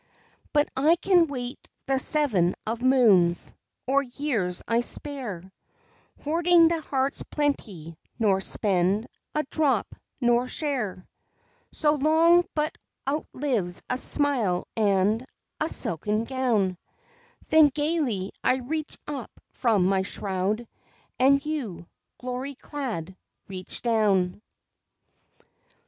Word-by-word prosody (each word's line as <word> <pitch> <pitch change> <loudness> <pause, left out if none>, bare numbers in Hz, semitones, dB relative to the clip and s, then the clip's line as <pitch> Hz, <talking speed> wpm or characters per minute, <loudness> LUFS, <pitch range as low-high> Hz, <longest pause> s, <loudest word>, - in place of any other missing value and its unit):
But 295 -1 +3
I 300 +5 +4
can 355 -1 +3
wait 250 -3 -6 0.2
the 270 -1 +1
seven 240 - +2
of 230 +2 -3
moons, 215 -10 +4 0.3
Or 275 +2 +2
years 245 -9 -2
I 230 +1 +2
spare, 240 - -3 0.8
Hoarding 335 +2 +4
the 330 -1 -1
heart's 270 -2 -1
plenty, 195 - -3 0.2
nor 195 -4 +2
spend 195 +2 0 0.3
A 305 - +1
drop, 275 -7 0 0.3
nor 240 0 +2
share 250 - -3 0.6
So 300 -2 +2
long 325 +4 +4
but 305 0 -1 0.3
outlives 255 - -1
a 250 - +1
smile 250 -14 +2
and 210 +1 +2 0.4
A 310 - 0
silken 210 +6 +1
gown; 230 -8 0 0.7
Then 315 -1 +7
gaily 290 - -1
I 255 - +3
reach 295 +4 -4
up 280 -5 -5 0.2
from 215 -7 +1
my 190 0 +2
shroud, 195 +4 -2 0.5
And 275 +2 +4
you, 255 - -4 0.3
glory 255 +2 -5
clad, 235 - -5 0.3
reach 185 -1 -5
down. 205 -5 +1
250 Hz, 105 wpm, -26 LUFS, 195-290 Hz, 0.8 s, Then